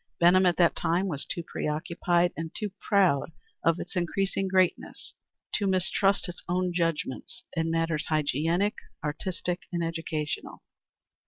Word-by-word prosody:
Benham 180 +2 +6
at 175 - +2
that 170 -2 +4
time 175 +4 +1
was 145 -6 -3
too 170 - -3
preoccupied 170 +3 0
and 165 0 -4
too 210 -2 -3
proud 185 -7 +3 0.3
of 165 +1 +3
its 180 - -7
increasing 195 +2 0
greatness 185 -1 0 0.4
to 200 - +1
mistrust 195 +2 +2
its 175 0 -7
own 180 0 +1
judgment 165 -6 -1 0.2
in 165 0 0
matters 165 -1 0
hygienic, 160 +6 +1 0.3
artistic, 170 +3 -2
and 170 -1 -1
educational. 165 -2 -3
170 Hz, 135 wpm, -28 LUFS, 165-185 Hz, 0.4 s, Benham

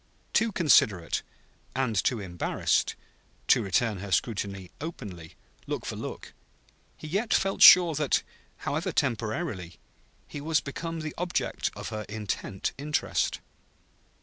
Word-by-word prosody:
Too 230 0 +3
considerate, 105 - +3 0.5
and 130 -4 0
too 115 +5 +1
embarrassed, 90 -3 0 0.5
to - - +6
return 100 +2 0
her 100 +1 -7
scrutiny 100 -2 -1
openly, 100 - -7 0.3
look - - -3
for - - -4
look, - - -7 0.6
he - - -10
yet 200 +8 -1
felt 195 0 0
sure 175 -3 +10
that, 150 -2 +1 0.4
however - - -1
temporarily, 110 - -2 0.5
he 145 - -7
was 155 +1 +2
become 165 +3 -5
the 155 -1 -5
object 180 0 -1
of - - -6
her 110 -1 -4
intent 105 -2 -3
interest. 150 +1 -1
120 Hz, 120 wpm, -28 LUFS, 100-160 Hz, 0.6 s, sure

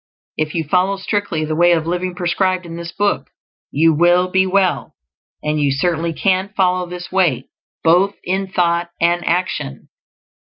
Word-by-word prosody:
If 155 +1 -2
you 165 - 0
follow 185 +5 +1
strictly 195 -5 -2
the 155 0 -2
way 175 +1 +5
of 160 -2 0
living 180 +1 -2
prescribed 185 +1 0
in 165 -1 -8
this 170 0 -6
book, 205 +2 -1 0.4
you 160 +3 +3
will 175 +3 +3
be 190 0 +3
well; 185 - 0 0.5
and 150 0 0
you 145 - +2
certainly 165 +3 0
CAN 190 +3 0
follow 180 -1 +1
this 180 0 -8
way, 170 -10 +1 0.3
both 180 +5 +3
in 190 +1 -1
thought 175 -2 0
and 175 +1 +2
action. 170 - -2
175 Hz, 160 wpm, -18 LUFS, 165-185 Hz, 0.5 s, way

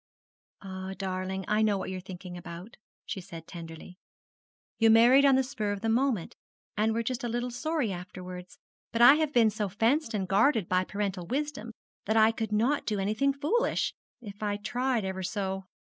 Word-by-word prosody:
'Ah, 190 0 -6
darling, 190 0 -3
I 210 +1 +2
know 210 -2 +3
what 190 - -4
you 185 - -4
are - - -5
thinking 180 -1 -9
about,' 175 +4 -9 0.3
she 195 - -5
said 165 -2 -10
tenderly. 165 +1 -10 0.8
'You 225 -1 +5
married 240 +5 +7
on 275 -1 +6
the 265 - +3
spur 215 -6 -3
of 200 -1 -4
the 225 - 0
moment, 235 -5 0 0.4
and 220 +1 +1
were 230 - 0
just 245 +2 -3
a 240 - -1
little 240 +2 -2
sorry 290 -2 -1
afterwards; 180 0 -8 0.3
but 230 +1 +3
I 255 - +10
have 310 -2 0
been 230 -5 +4
so 210 -1 -2
fenced 225 - +1
and 190 -3 -1
guarded 210 - +3
by 185 0 +1
parental 195 -4 -3
wisdom 280 -3 -3 0.3
that 220 +2 +1
I 220 0 +6
could 225 -1 -4
not 240 +8 +1
do 210 - 0
anything 215 +8 +1
foolish 315 - 0 0.3
if 205 -3 -10
I 205 -1 -1
tried 245 +1 -1
ever 190 0 -3
so. 190 0 -3
210 Hz, 190 wpm, -29 LUFS, 190-240 Hz, 0.8 s, I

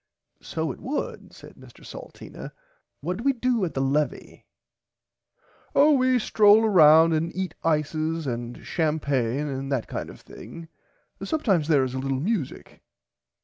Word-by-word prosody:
So 160 -2 -3
it - - -10
would 280 +4 -5
said - - -15
Mr - - -16
Salteena - - -10 0.5
what 180 +1 -3
do 225 - -7
we 275 0 +3
do 245 -3 0
at 165 - -6
the 135 - 0
levie. 145 +3 -2 1.3
Oh 295 +2 +6
we 255 -2 +3
strole 215 -1 +4
round 160 -4 +6
and 160 +2 -1
eat 185 -3 -3
ices 155 +1 -1
and 120 -1 -5
champaigne 145 -4 -1
and 135 0 -5
that 130 -5 -1
kind - - -5
of - - -12
thing 165 -1 -11 0.5
and - - -6
sometimes 210 - +1
there 145 -5 +3
is 130 -1 -3
a 130 - -3
little 135 0 -2
music. 180 - -4
160 Hz, 150 wpm, -25 LUFS, 140-210 Hz, 1.3 s, Oh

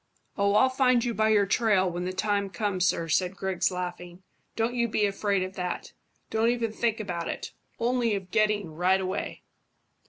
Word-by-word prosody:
"Oh, 200 0 +2
I'll 260 +5 +5
find 255 -2 +3
you 240 - -1
by 220 0 +2
your 210 -2 +4
trail 205 -2 +2
when 175 0 -3
the 185 - -2
time 200 +1 0
comes, 185 -1 0
sir," 165 -2 0
said 180 +4 +1
Griggs, 190 -1 0
laughing. 180 0 -6 0.3
"Don't 230 +2 0
you 235 -1 +1
be 215 -1 +1
afraid 200 -1 0
of 185 +1 -5
that. 180 -1 -4 0.4
Don't 225 +1 +2
even 235 -2 0
think 225 0 -1
about 175 -5 -3
it, - - -5 0.3
only 235 -2 +1
of 190 -2 -6
getting 210 -6 +1
right 180 +4 +2
away." 185 0 -4
200 Hz, 185 wpm, -27 LUFS, 185-220 Hz, 0.4 s, I'll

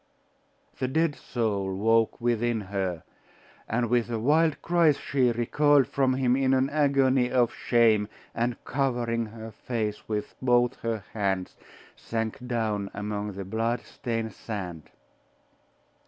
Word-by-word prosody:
The 130 - 0
dead 155 +2 +1
soul 100 -5 -2
woke 115 +3 +2
within 120 -1 +1
her; 95 -4 -3 0.7
and 120 +1 +1
with 120 0 +1
a 115 - -1
wild 155 +7 +2
cry 170 -3 +4
she 135 -3 +1
recoiled 140 +4 +3
from 130 -2 +1
him 130 -1 +2
in 135 0 +2
an 130 +1 +1
agony 135 -4 +3
of 120 -2 +2
shame, 110 -4 +3 0.3
and 120 +1 -1
covering 120 -4 -1
her 110 +1 -9
face 110 -3 -4
with 105 -1 -3
both 125 -1 +3
her 115 -3 -3
hands, 95 -3 -1 0.4
sank 115 +2 -4
down 110 -4 -1
among 105 0 -3
the 95 0 -6
blood 115 +4 -1
stained 115 -4 -4
sand. 90 -7 -6
115 Hz, 130 wpm, -27 LUFS, 105-130 Hz, 0.7 s, cry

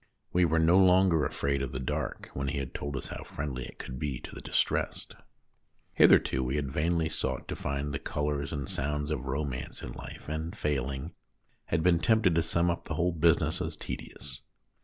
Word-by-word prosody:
We 90 0 +5
were 80 0 +2
no 85 +3 +5
longer 90 -4 +5
afraid 70 -1 0
of 65 -1 -3
the 65 - -2
dark 65 - -3
when 70 0 -2
he 70 - -1
had 70 -2 -4
told 70 -2 -3
us 65 - -4
how - - -6
friendly 65 -4 -4
it - - -12
could 65 0 -6
be 70 -3 -2
to - - -9
the - - -8
distressed. - - -1 0.8
Hitherto 65 0 +5
we 65 +2 -1
had 70 -3 -1
vainly 80 +3 +1
sought - - -3
to - - -2
find 70 +1 -3
the 70 - -2
colours 75 -1 -2
and 70 -3 -3
sounds 75 +1 -1
of 70 -3 -2
romance 65 -2 -3
in 60 - -5
life, - - -9
and, 80 +6 -4
failing, 70 0 -2 0.5
had 80 0 0
been 85 -1 +4
tempted 110 -2 +4
to 85 - +3
sum 85 +1 +2
up 85 - -4
the 80 - -3
whole 90 +3 +2
business 85 0 +2
as - - -3
tedious. 65 -4 -7
75 Hz, 200 wpm, -30 LUFS, 70-85 Hz, 0.8 s, We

